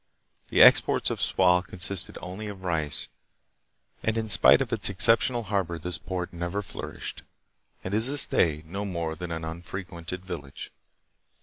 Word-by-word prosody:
The - - +6
exports - - +5
of - - -4
Sual 90 -1 +3
consisted 90 0 -3
only 95 +4 -6
of 100 -2 -9
rice, 80 -5 0 0.9
and 110 +1 -1
hi 110 -1 -2
spite 95 - +6
of 130 -3 -2
its 105 -4 +1
exceptional 115 +4 +3
harbor 95 -5 -2
this 85 +1 -2
port 90 -1 -5
never 85 +4 -3
flourished, - - -7 0.6
and 95 - -5
is 110 +3 +5 0.2
to - - -6
day 75 -2 +2
no 95 +5 -5
more 85 -5 -3
than 90 +2 -7
an 80 -1 -4
unfrequented 85 +1 -7
village. 80 -7 -8
90 Hz, 150 wpm, -26 LUFS, 85-100 Hz, 0.9 s, The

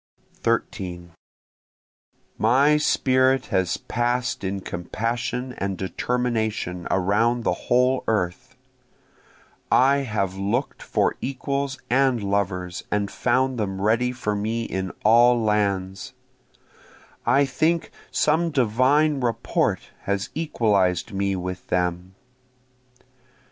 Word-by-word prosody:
13 90 -6 -2 1.3
My 135 +7 +4
spirit 130 -3 +2
has 95 -2 +1
pass'd 120 -1 -1
in 95 +1 -2
compassion 120 +8 -3
and 95 -1 -2
determination 110 -4 -2
around 110 +6 +1
the - - +1 0.2
whole 125 +1 +3
earth, 90 -6 -2 1.2
I 135 +2 +5
have 105 -8 -2
look'd 105 +8 -2
for - - 0
equals 140 +1 -2
and 130 -3 +2
lovers 95 -2 -2
and 100 -1 -1
found 130 0 +1
them 95 -2 -2
ready 115 +5 +2
for 120 -4 -2
me 110 +3 -2
in 95 -4 -3
all 120 +2 +6
lands, 100 -3 -1 1.1
I 140 +1 +4
think 160 +5 0 0.2
some 160 +3 +2
divine 140 +3 +2
rapport 115 -2 0 0.3
has 100 0 -1
equalized 105 - +1
me 100 0 0
with 90 0 -5
them. 90 +1 -1
115 Hz, 100 wpm, -24 LUFS, 95-130 Hz, 1.3 s, all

